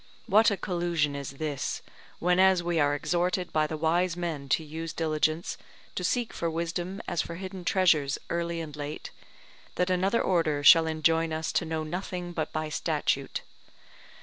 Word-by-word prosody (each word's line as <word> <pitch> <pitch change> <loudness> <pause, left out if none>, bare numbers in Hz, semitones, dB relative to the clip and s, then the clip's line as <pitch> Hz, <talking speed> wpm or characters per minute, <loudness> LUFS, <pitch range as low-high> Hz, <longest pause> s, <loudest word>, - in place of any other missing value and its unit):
What 215 +3 +5
a 200 - -1
collusion 170 -5 0
is 140 -1 -5
this, 145 -1 -3 0.3
whenas 180 +1 +4
we 170 -1 0
are 145 -1 +3
exhorted 175 +4 -1
by 155 -1 +2
the 155 - -4
wise 170 +3 +1
man 160 -6 -4
to 160 - +2
use 160 +1 -6
diligence, 155 0 0 0.3
to 180 - -3
seek 235 +6 0
for 170 - -2
wisdom 170 +3 -3
as 175 - 0
for 170 - -6
hidden 185 +1 -7
treasures 165 -6 +3
early 170 0 -2
and 150 -2 -7
late, 145 0 -6 0.6
that 180 +1 +1
another 190 +5 +2
order 155 -5 +1
shall 165 +2 +8
enjoin 160 +1 +2
us 160 +1 -2
to - - 0
know 160 -1 -2
nothing 180 +2 -4
but 160 -2 -2
by 155 0 -2
statute? 155 - -1
165 Hz, 165 wpm, -28 LUFS, 155-180 Hz, 0.6 s, shall